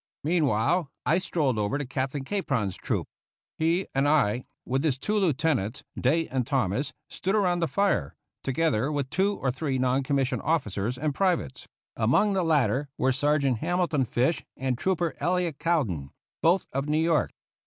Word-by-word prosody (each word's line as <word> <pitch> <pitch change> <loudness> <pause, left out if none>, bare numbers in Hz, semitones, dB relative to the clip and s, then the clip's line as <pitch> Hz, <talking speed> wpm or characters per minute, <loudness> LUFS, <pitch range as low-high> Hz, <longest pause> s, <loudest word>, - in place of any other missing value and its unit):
Meanwhile 150 0 +2 0.2
I - - +3
strolled 150 -10 0
over 105 +6 0
to 145 - -3
Captain 135 +1 -3
Capron's 135 - -1
troop. - - -2 0.5
He 165 +4 +2
and 135 +1 +2
I, 130 -5 +2 0.2
with 135 +3 0
his 145 -5 +1
two 210 +10 -2
lieutenants, 145 - 0
Day 160 +6 +1
and 125 -2 -1
Thomas, 130 0 0 0.2
stood 195 +3 -2
around 180 -4 +2
the 165 - +1
fire, 195 - 0 0.3
together 135 -2 +1
with 140 -3 -2
two 200 +2 +1
or 135 - 0
three 135 +1 -2
non 130 +1 +2
commissioned 135 0 0
officers 125 - -1
and 150 +2 -1
privates; 180 - -1 0.3
among 130 - +3
the 190 - +1
latter 145 -4 +1
were 130 - +2
Sergeant 140 -2 +1
Hamilton 170 -4 +1
Fish 125 +8 0
and 130 -1 -1
Trooper 175 +3 0
Elliot 175 -4 0
Cowdin, 120 - 0 0.3
both 175 +3 +3
of 135 +2 -2
New 150 - +2
York. 160 -1 +2
145 Hz, 160 wpm, -27 LUFS, 130-165 Hz, 0.5 s, I